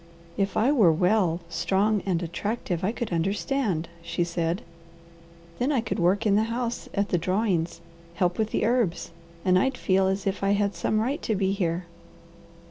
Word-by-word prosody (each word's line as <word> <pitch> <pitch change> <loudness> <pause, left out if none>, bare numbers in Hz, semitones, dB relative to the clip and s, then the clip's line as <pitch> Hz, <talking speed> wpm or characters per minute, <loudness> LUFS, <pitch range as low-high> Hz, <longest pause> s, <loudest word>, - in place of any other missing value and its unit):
"If 195 0 -1
I 245 +6 +4
were 215 - +5
well, 180 0 +2
strong, 200 +4 +1
and 180 -2 0
attractive, 180 +1 -3
I 195 - +2
could 230 -5 -4
understand," 190 - 0
she 170 +1 -1
said. 170 +1 -2 1.0
"Then 255 +4 +1
I 275 - +2
could 225 - -3
work 185 +6 +2
in 205 -2 +4
the 215 +1 +3
house, 235 +1 -3
at 200 0 0
the 175 - +1
drawings, 175 -2 0 0.3
help 180 +2 0
with 220 -1 +1
the - - 0
herbs, 220 -9 0 0.3
and 185 -1 +5
I'd 265 +4 0
feel 190 0 +2
as 190 0 -1
if 195 0 -1
I 200 0 +3
had 205 0 +1
some 215 - 0
right 275 +8 -1
to 220 - -1
be 190 -1 +1
here." 175 -3 -1
195 Hz, 180 wpm, -26 LUFS, 175-220 Hz, 1.0 s, were